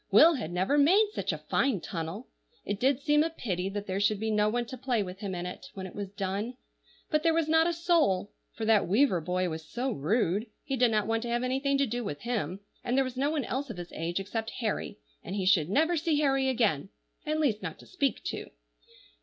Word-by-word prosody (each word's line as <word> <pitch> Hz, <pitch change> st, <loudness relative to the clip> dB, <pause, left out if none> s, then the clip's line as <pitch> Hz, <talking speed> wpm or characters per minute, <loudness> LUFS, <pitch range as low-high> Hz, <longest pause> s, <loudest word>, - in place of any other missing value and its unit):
Will 335 Hz, +1 st, +7 dB
had 220 Hz, -, -4 dB
never 190 Hz, +12 st, +2 dB
made 390 Hz, +9 st, +5 dB
such -, -, -1 dB
a -, -, -3 dB
fine 260 Hz, -8 st, +1 dB
tunnel; 170 Hz, +7 st, -5 dB, 0.4 s
it 205 Hz, -1 st, -2 dB
did 265 Hz, +2 st, +3 dB
seem 295 Hz, +1 st, +3 dB
a 325 Hz, -, +2 dB
pity 195 Hz, -, -3 dB
that 205 Hz, +1 st, -4 dB
there 190 Hz, 0 st, -2 dB
should 205 Hz, 0 st, +2 dB
be 220 Hz, +1 st, -1 dB
no 210 Hz, 0 st, +3 dB
one 240 Hz, +2 st, -1 dB
to 260 Hz, -, -7 dB
play 250 Hz, -4 st, 0 dB
with 185 Hz, 0 st, -8 dB
him 200 Hz, -3 st, -4 dB
in 175 Hz, 0 st, -4 dB
it, 180 Hz, +9 st, -7 dB
when 190 Hz, -1 st, -5 dB
it 185 Hz, -, -8 dB
was 200 Hz, -2 st, -5 dB
done. 200 Hz, +5 st, -3 dB, 0.5 s
But 305 Hz, -1 st, +3 dB
there 325 Hz, 0 st, +3 dB
was 330 Hz, -2 st, +2 dB
not 320 Hz, +1 st, +4 dB
a -, -, +2 dB
soul; 325 Hz, -, +2 dB, 0.2 s
for 225 Hz, -, -5 dB
that 215 Hz, -2 st, +4 dB
Weaver 200 Hz, -2 st, +3 dB
boy 180 Hz, +2 st, 0 dB
was 160 Hz, -1 st, -4 dB
so 250 Hz, +9 st, -3 dB
rude, 205 Hz, -, 0 dB, 0.2 s
he 270 Hz, -, -2 dB
did 245 Hz, -1 st, +4 dB
not 215 Hz, -2 st, +1 dB
want 225 Hz, +1 st, 0 dB
to 240 Hz, -, -4 dB
have 240 Hz, +1 st, 0 dB
anything 270 Hz, +2 st, +1 dB
to 280 Hz, -, +3 dB
do 240 Hz, 0 st, -3 dB
with 145 Hz, -8 st, -5 dB
him, 200 Hz, -6 st, -2 dB, 0.2 s
and 245 Hz, +2 st, 0 dB
there 270 Hz, -, +5 dB
was 255 Hz, -1 st, -5 dB
no 275 Hz, +3 st, +1 dB
one 300 Hz, -5 st, -1 dB
else 275 Hz, +2 st, -3 dB
of 220 Hz, -, -6 dB
his 175 Hz, -1 st, -7 dB
age 170 Hz, +3 st, -2 dB
except 220 Hz, +3 st, -3 dB
Harry, 220 Hz, -4 st, -2 dB, 0.3 s
and 185 Hz, -, -5 dB
he 195 Hz, -2 st, -1 dB
should 175 Hz, -4 st, +4 dB
never 320 Hz, -, +3 dB
see 315 Hz, -2 st, +1 dB
Harry 270 Hz, -2 st, +2 dB
again, 210 Hz, -, +1 dB, 0.4 s
at 310 Hz, +1 st, 0 dB
least 240 Hz, -9 st, +1 dB
not -, -, -5 dB
to -, -, -15 dB
speak 280 Hz, -8 st, -1 dB
to. -, -, -4 dB
225 Hz, 240 wpm, -29 LUFS, 195-275 Hz, 0.5 s, Will